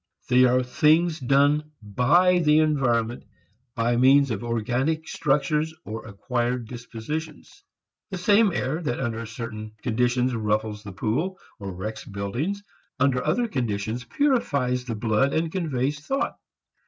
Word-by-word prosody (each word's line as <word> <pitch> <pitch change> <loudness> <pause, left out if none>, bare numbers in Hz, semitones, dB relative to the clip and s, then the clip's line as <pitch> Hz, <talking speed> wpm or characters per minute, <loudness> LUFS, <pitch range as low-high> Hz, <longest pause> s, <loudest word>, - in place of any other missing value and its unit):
They 125 0 +6
are 125 +1 +3
things 155 +6 +2
done 145 +3 +2
by 145 - +3
the 150 -2 +4
environment 125 -7 +1 0.5
by 120 +1 +1
means 135 +2 +5
of 110 +1 -3
organic 125 +7 -1
structures 150 +2 0
or 110 0 -6
acquired 120 +3 -2
dispositions. 145 - -7 0.5
The 190 - -4
same 205 +3 +4
air 155 0 -2
that 135 -7 -2
under 115 -3 -3
certain 110 -2 -7
conditions 125 +1 +1
ruffles 105 -1 -1
the 100 - -8
pool 130 - -2 0.2
or 100 -2 -5
wrecks 100 +5 -6
buildings, 120 - -3 0.4
under 130 -2 +2
other 210 +11 +1
conditions 115 - -2
purifies 135 - 0
the 115 -3 -3
blood 110 +5 +1
and 160 0 0
conveys 145 -6 -1
thought. 270 - -2
125 Hz, 130 wpm, -25 LUFS, 115-155 Hz, 0.5 s, They